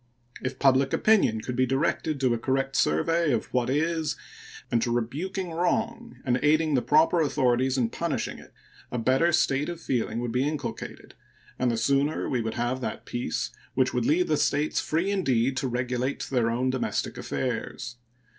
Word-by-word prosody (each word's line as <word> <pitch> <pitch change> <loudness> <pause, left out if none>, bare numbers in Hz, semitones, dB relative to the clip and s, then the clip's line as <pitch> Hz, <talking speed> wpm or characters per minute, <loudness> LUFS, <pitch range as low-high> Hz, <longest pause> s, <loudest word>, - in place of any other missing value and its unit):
If 130 0 -3
public 135 0 +3
opinion 190 - +3
could 125 - -4
be 130 +1 +2
directed 140 +2 0
to 130 -2 +3
a 120 - -1
correct 135 +2 -1
survey 165 - +2
of 115 - -2
what 125 -1 +1
is 160 +1 0 0.6
and 115 - +2
to 120 - 0
rebuking 165 - -2
wrong 230 +8 -1
and 125 -1 +2
aiding 155 +1 +3
the 130 - +3
proper 160 +5 +4
authorities 130 -3 +2
in 115 -3 +1
punishing - - -3
it, - - -15 0.4
a 125 - -2
better 130 +8 +3
state 145 -2 +2
of 170 -1 -5
feeling 120 -7 -1
would 120 -1 -2
be 125 +2 +1
inculcated, 145 -2 -5 0.5
and 125 - +2
the 115 - 0
sooner 140 +5 +1
we 125 -3 0
would 110 0 -3
have 120 +2 -1
that - - -4
peace 120 -9 -3 0.2
which 130 -1 +2
would 125 -2 0
leave 175 +4 +3
the 155 - +2
States 145 +2 +1
free 170 +6 0
indeed 135 - +1
to 130 - 0
regulate 125 +2 -2
their 120 -3 +2
own 125 +3 0
domestic 130 - -2
affairs. 120 -1 -4
130 Hz, 175 wpm, -27 LUFS, 125-155 Hz, 0.6 s, proper